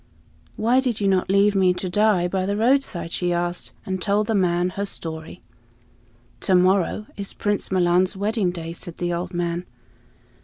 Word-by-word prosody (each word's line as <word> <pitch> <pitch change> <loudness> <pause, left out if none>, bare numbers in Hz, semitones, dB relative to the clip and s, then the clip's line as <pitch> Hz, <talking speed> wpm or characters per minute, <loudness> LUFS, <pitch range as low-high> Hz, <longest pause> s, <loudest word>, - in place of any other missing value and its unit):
"Why 235 +4 +3
did 250 -4 -1
you 200 - +1
not 190 -1 +1
leave 200 +1 +4
me 185 -2 +3
to 185 - -3
die 200 -1 +2
by 185 +1 -1
the 200 +1 -1
roadside?" 230 -7 +1
she 175 0 -1
asked, 175 0 -2
and 190 -1 -3
told 205 +2 +1
the 225 - -1
old 205 - +3
man 175 0 +1
her 200 +2 -3
story. 160 -1 -7 1.0
"To 185 - +2
morrow 185 +3 +2
is 200 -1 -4
Prince 205 -2 -1
Milan's 185 +1 +2
wedding 205 -1 0
day," 165 -2 -5
said 170 0 -8
the 175 0 -1
old 175 +1 -3
man. 175 -1 -2
185 Hz, 180 wpm, -23 LUFS, 175-205 Hz, 1.0 s, leave